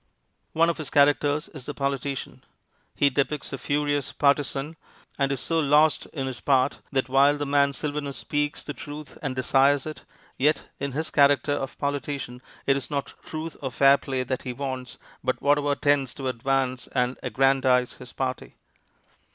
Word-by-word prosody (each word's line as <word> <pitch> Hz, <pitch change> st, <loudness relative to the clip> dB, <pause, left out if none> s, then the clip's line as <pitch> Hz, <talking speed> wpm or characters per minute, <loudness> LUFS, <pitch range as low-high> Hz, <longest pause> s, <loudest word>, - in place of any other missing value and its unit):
One 165 Hz, +1 st, +4 dB
of 170 Hz, -1 st, -1 dB
his 150 Hz, -4 st, -4 dB
characters 145 Hz, +1 st, +3 dB
is 150 Hz, -10 st, -10 dB
the 145 Hz, -, -5 dB
politician. 140 Hz, 0 st, -3 dB, 0.5 s
He 140 Hz, -1 st, +3 dB
depicts 140 Hz, +2 st, -1 dB
a -, -, -2 dB
furious 145 Hz, -1 st, 0 dB
partisan, 145 Hz, +1 st, +1 dB, 0.4 s
and 140 Hz, 0 st, +2 dB
is 135 Hz, -, -1 dB
so 165 Hz, +5 st, 0 dB
lost 150 Hz, +1 st, +3 dB
in 135 Hz, -4 st, -4 dB
his 130 Hz, -2 st, -5 dB
part 135 Hz, -1 st, +2 dB
that 135 Hz, -3 st, 0 dB
while 140 Hz, +2 st, +4 dB
the 145 Hz, -, -2 dB
man 140 Hz, 0 st, +3 dB
Sylvanus 145 Hz, 0 st, -4 dB
speaks 145 Hz, 0 st, -2 dB
the 145 Hz, -, -5 dB
truth 145 Hz, +3 st, -9 dB
and 135 Hz, -4 st, -3 dB
desires 135 Hz, +2 st, +3 dB
it, 155 Hz, 0 st, -7 dB, 0.4 s
yet 150 Hz, +3 st, +2 dB
in 140 Hz, -1 st, -3 dB
his 155 Hz, +3 st, -2 dB
character 140 Hz, -1 st, +4 dB
of 135 Hz, -2 st, -4 dB
politician 140 Hz, -3 st, -3 dB, 0.2 s
it 135 Hz, -, +4 dB
is 140 Hz, -, -4 dB
not 140 Hz, -2 st, -3 dB
truth 160 Hz, 0 st, -6 dB
or 135 Hz, -, -2 dB
fair 140 Hz, +2 st, +5 dB
play 130 Hz, -1 st, -2 dB
that 130 Hz, 0 st, -3 dB
he 125 Hz, -, -5 dB
wants, 130 Hz, -1 st, -5 dB, 0.3 s
but 130 Hz, 0 st, 0 dB
whatever 145 Hz, 0 st, +2 dB
tends 140 Hz, -3 st, +1 dB
to 135 Hz, -, -4 dB
advance 130 Hz, +1 st, -1 dB
and 125 Hz, 0 st, 0 dB
aggrandize 130 Hz, 0 st, +2 dB
his 125 Hz, -1 st, -11 dB
party. 130 Hz, -1 st, -4 dB
140 Hz, 170 wpm, -26 LUFS, 130-145 Hz, 0.5 s, fair